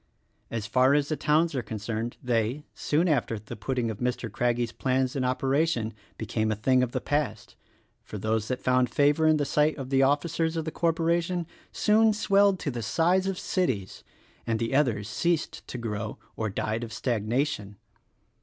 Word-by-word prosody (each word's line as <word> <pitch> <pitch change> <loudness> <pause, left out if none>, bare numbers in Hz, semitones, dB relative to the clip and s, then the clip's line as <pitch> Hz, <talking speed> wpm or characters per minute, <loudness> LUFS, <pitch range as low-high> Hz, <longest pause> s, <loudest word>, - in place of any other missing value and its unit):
As 110 -3 -3
far 130 +4 +4
as 145 -1 +1
the 155 - 0
towns 155 +2 +2
are 130 - -1
concerned 110 +1 -4
they, 120 +3 0
soon 160 +5 +1
after 125 -7 +1
the 105 0 -8
putting 120 +2 -2
of 105 - -8
Mr. 125 -2 -2
Craggie's 120 +1 0
plans 130 +1 0
in 135 - 0
operation, 130 -2 0 0.2
became 110 0 -1
a - - 0
thing 130 +4 +3
of 125 -2 0
the - - -1
past; 145 -8 -2 0.5
for 105 - -7
those 110 +1 -1
that 130 - -2
found 125 -1 +3
favor 145 +5 +3
in 155 0 +5
the 145 - 0
sight 150 +2 +2
of 135 -1 -6
the 135 0 +4
officers 160 +4 +1
of 160 - -2
the 160 - -3
corpora 170 +1 +1
tion 175 0 -3 0.3
soon 220 +1 +4
swelled 200 -2 +3
to 145 - -2
the 120 -1 -4
size 175 - +2
of 195 -1 -2
cities 130 - -2 0.2
— - - -32
and 115 -1 +1
the 115 +3 -2
others 120 -8 +2
ceased 170 +8 -1
to - - -6
grow 110 -2 -4 0.2
or 110 -1 -2
died 110 +3 -2
of 115 - -6
stagnation. 115 0 -1
130 Hz, 185 wpm, -27 LUFS, 115-155 Hz, 0.5 s, in